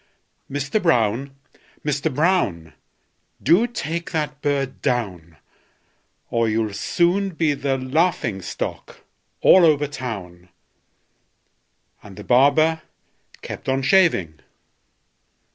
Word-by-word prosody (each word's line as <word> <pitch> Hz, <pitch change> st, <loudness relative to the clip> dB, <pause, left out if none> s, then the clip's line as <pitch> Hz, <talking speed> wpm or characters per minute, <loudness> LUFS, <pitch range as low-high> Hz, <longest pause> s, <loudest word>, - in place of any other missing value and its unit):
Mister 145 Hz, +8 st, -1 dB
Brown! 135 Hz, -, +1 dB, 0.5 s
Mister 145 Hz, -1 st, -1 dB
Brown! 130 Hz, -, 0 dB, 0.7 s
Do 175 Hz, -, +4 dB
take 170 Hz, -6 st, -4 dB
that 150 Hz, -3 st, -3 dB
bird 140 Hz, -2 st, -2 dB
down, 90 Hz, -10 st, -3 dB, 0.9 s
Or 115 Hz, -1 st, +1 dB
you'll 110 Hz, -1 st, -1 dB
soon 175 Hz, -, +1 dB
be 160 Hz, -2 st, +1 dB
the 135 Hz, -1 st, -1 dB
laughing 130 Hz, -, 0 dB
stock -, -, -6 dB, 0.4 s
all 185 Hz, -, +7 dB
over 150 Hz, -3 st, +4 dB
town!" 100 Hz, -11 st, -7 dB, 1.5 s
And 100 Hz, -2 st, -13 dB
the 105 Hz, -, -9 dB
barber 155 Hz, +7 st, +3 dB, 0.6 s
kept -, -, -6 dB
on 135 Hz, 0 st, 0 dB
shaving. 130 Hz, -, +2 dB
140 Hz, 95 wpm, -22 LUFS, 110-160 Hz, 1.5 s, all